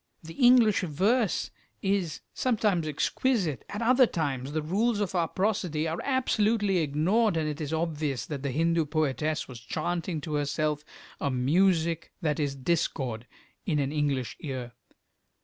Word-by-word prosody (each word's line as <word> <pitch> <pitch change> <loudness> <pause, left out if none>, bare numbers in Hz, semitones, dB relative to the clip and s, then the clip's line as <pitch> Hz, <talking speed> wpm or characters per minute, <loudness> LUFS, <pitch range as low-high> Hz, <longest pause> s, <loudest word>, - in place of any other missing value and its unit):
The 165 +1 -9
English 245 -2 +5
verse 195 - +1 0.3
is 195 -4 0
sometimes 210 -9 +1
exquisite; 165 - 0
at 210 +3 -3
other 255 +1 +5
times 140 -7 -2
the 155 0 -2
rules 205 +7 +1
of 205 -3 -1
our 170 -3 +1
prosody 180 -6 -1
are 160 +1 -3
absolutely 220 -7 +2
ignored, 170 +7 +2
and 155 -1 0
it 150 +1 -4
is 150 -1 -3
obvious 155 -4 -1
that 145 -3 -5
the 140 - -2
Hindu 165 +4 +1
poetess 155 0 -1
was 125 -3 -9
chanting 170 +7 -3
to 150 +2 -5
herself 150 +1 -1 0.4
a 140 - 0
music 165 +5 +2
that 155 -4 -1
is 140 -2 -1
discord 130 -5 -1 0.4
in 155 -5 +1
an 140 -1 0
English 145 -5 -1
ear. 130 -5 -5
160 Hz, 150 wpm, -28 LUFS, 145-195 Hz, 0.4 s, English